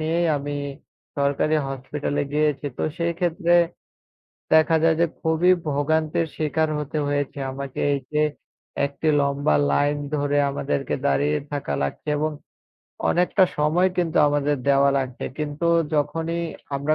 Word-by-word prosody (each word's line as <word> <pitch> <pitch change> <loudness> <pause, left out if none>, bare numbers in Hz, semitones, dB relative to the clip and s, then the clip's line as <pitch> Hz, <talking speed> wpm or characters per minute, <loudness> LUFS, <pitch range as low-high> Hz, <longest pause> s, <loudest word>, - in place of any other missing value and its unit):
নিয়েই 165 +2 +1
আমি 145 +1 -4 0.6
সরকারি 140 +2 +1
হসপিটালে 145 +2 -3
গিয়েছি। 150 -1 +1
তো - - -1 0.2
সেই 170 0 0
ক্ষেত্রে, 175 -1 +1 1.0
দেখা 160 +1 +5
যায় 165 -1 +4
যে 170 - +5
খুবই 160 +3 +3 0.2
ভোগান্তের 155 +3 +1
শিকার 155 +1 0
হতে 150 +1 -3
হয়েছে 145 0 -2
আমাকে 135 0 -7
এই 140 - +1
যে, 150 - +2 0.6
একটি 140 +3 -3
লম্বা 140 - +1 0.2
লাইন 145 - +2 0.2
ধরে 145 0 0
আমাদেরকে 140 0 -2
দাঁড়িয়ে 145 +2 +2
থাকা 140 - -2
লাগছে 70 - -4
এবং 155 +1 0 0.8
অনেকটা 180 +2 +3
সময় 160 +5 +3
কিন্তু 175 -3 0
আমাদের 145 0 +1
দেওয়া 140 0 +5
লাগছে। 130 -2 -4
কিন্তু 150 +2 -2 0.3
যখনই 165 +3 -1 0.3
আমরা 145 +3 +1
150 Hz, 130 wpm, -23 LUFS, 140-160 Hz, 1.0 s, দেখা